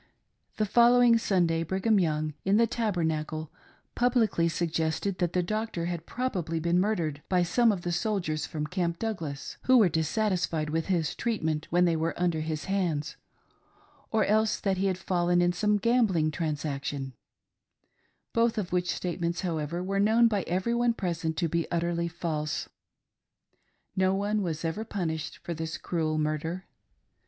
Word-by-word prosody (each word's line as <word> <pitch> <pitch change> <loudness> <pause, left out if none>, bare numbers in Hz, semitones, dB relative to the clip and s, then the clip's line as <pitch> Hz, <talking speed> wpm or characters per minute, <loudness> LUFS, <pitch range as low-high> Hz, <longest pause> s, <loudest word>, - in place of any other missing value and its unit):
* - - -41
The 215 - +2
following 240 +1 +5
Sunday, 175 -6 +1
Brigham 195 +5 +1
Young, 155 -3 0
in 195 +2 +3
the 230 - +5
Tabernacle, 160 -9 -2 0.4
publicly 230 -9 +2
suggested 165 +3 -1
that 175 -2 0
the 180 - +2
doctor 215 -2 -2
had 170 -1 -4
probably 180 -10 -2
been 170 +2 +2
mur 210 +4 +2
dered 155 -5 -2
by 180 -1 +3
some 230 +7 +3
of 185 -4 -3
the, 175 - -1
soldiers 170 -5 -1
from 150 -1 -3
Camp 170 0 -1
Douglas, 170 -11 -4
who 260 0 +6
were 210 -6 +6
dissatisfied 160 -1 0
with 165 0 -1
his 170 -5 0
treatment 160 -10 -2
when 175 +1 +3
they 170 -2 +2
were 160 +2 -2
under 175 -3 +1
his 155 -1 -3
hands, 175 -6 -1 0.9
or 220 -2 +2
else 215 +1 +2
that 195 -2 0
he 195 +1 +1
had 185 -2 0
fallen 175 -1 +1
in 175 0 +3
some 210 +3 +2
gambling 200 -8 +2
transaction 145 -4 -3 0.6
— - - -45
both 230 0 +2
of 190 -5 -2
which 180 0 +1
statements, 170 -1 -2
however, 170 -1 -2
were 195 +1 -1
known 220 +3 +5
by 210 -3 0
every 185 +7 0
one 235 -1 +2
pres 175 -5 -3
ent 160 -1 -1
to 170 - +1
be 170 +1 -1
utterly 170 0 0
false. 160 -3 -3 1.3
No 190 0 +2
one 205 +2 0
was 165 -3 -3
ever 165 +7 -2
punished 160 -7 -3
for 170 - -5
this 160 0 -4
cruel 160 -3 -1
murder. 155 +4 -2
175 Hz, 165 wpm, -28 LUFS, 160-205 Hz, 1.3 s, who